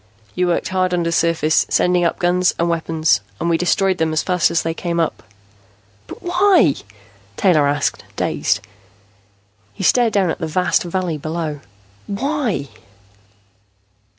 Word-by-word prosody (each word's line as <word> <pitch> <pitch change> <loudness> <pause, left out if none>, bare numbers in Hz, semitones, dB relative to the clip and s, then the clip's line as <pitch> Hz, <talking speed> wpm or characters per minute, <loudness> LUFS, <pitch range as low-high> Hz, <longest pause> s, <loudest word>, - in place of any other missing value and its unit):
You 180 0 0
worked 175 - 0
hard 185 -1 0
undersurface, 165 -2 +1
sending 180 0 +2
up 170 - 0
guns 180 +1 +1
and 170 - 0
weapons, 160 - +1 0.2
and 170 +1 0
we 165 - +3
destroyed 190 +1 +1
them 160 -1 0
as 155 - 0
fast 180 -2 +2
as 165 - 0
they 165 - -2
came 170 0 -3
up." 165 - -1 0.9
"But - - -11
why?" 355 - +4 0.6
Taylor 155 -7 +3
asked, 145 0 -1
dazed. - - 0 1.1
He - - -6
stared 235 +4 +3
down 190 -4 +2
at - - -5
the 160 - -3
vast 180 +4 +1
valley 175 -3 -3
below. 155 -1 -4 0.5
"Why?" 220 - -2
170 Hz, 140 wpm, -19 LUFS, 160-185 Hz, 1.1 s, why